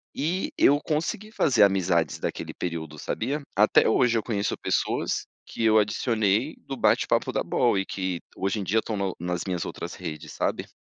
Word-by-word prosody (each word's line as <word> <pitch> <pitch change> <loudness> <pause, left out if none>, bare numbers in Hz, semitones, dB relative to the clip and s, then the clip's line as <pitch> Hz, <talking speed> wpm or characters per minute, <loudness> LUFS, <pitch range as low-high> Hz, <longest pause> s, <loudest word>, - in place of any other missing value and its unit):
E 170 +7 -1
eu 145 +1 +5
consegui 170 +9 -2
fazer 125 - +4
amizades 90 -5 +2
daquele - - -4
período, 80 -3 -5
sabia? 145 - -2
Até 105 +2 +5
hoje 120 0 +3
eu 110 - -1
conheço 105 -3 -1
pessoas, - - -1 0.2
que - - -4
eu 110 0 +5
adicionei 110 +3 +1
do 135 - -4
bate-papo - - +2
da - - 0
bol, 120 -5 +2
e 95 - 0
que 95 -3 -3 0.2
hoje 100 +3 -1
em - - -2
dia 105 +4 +2
estão 110 0 -3
no 95 -2 -1
nas 90 0 -2
minhas 90 -3 -2
outras - - -6
redes, 80 -4 -7
sabe? - - -2
105 Hz, 175 wpm, -26 LUFS, 90-125 Hz, 0.2 s, eu